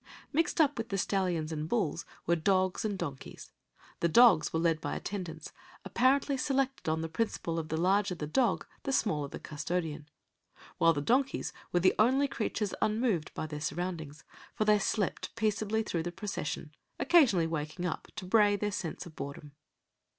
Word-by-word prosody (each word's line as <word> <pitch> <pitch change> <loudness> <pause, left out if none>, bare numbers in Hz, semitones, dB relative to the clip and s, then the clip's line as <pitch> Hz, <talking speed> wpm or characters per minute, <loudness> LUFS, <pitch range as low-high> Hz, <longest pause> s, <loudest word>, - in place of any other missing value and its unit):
Mixed 330 +3 +1
up 290 -5 +3
with 225 +1 -3
the 195 - -1
stallions 180 -5 0
and 155 0 -3
bulls 170 -8 0 0.2
were 170 - +3
dogs 185 +2 +1
and 205 -3 -1
donkeys. 140 -8 -7 0.5
The 170 - +2
dogs 225 -3 +6
were 160 - 0
led 165 -1 +1
by - - -3
attendants, 175 -6 -6 0.3
apparently 265 +7 +2
selected 270 - 0
on 160 0 0
the 165 - -2
principle 165 -2 -2
of 155 -1 -5
the 160 - -1
larger 190 +2 +2
the 155 - -4
dog 220 - +1 0.2
the 275 - -2
smaller 155 - +1
the - - -7
custodian; 155 0 -4 0.7
while 165 0 +5
the 145 - -2
donkeys 265 - +1 0.2
were 175 - +2
the 185 - +5
only 260 +6 +4
creatures 215 -6 -2
unmoved 215 -7 +1
by - - -3
their 150 -1 -6
surroundings, 160 -4 -4 0.3
for 215 - 0
they 210 0 +5
slept 200 -1 -1
peaceably 220 0 0
through 170 -6 -2
the 175 +2 -4
procession, 155 -6 -5 0.3
occasionally 260 - +5
waking 160 +2 -3
up 175 - -3
to - - -6
bray 205 +1 +4
their 205 +1 -1
sense 180 -2 -4
of 165 -3 -12
boredom. 140 +1 -7
185 Hz, 170 wpm, -31 LUFS, 160-220 Hz, 0.7 s, dogs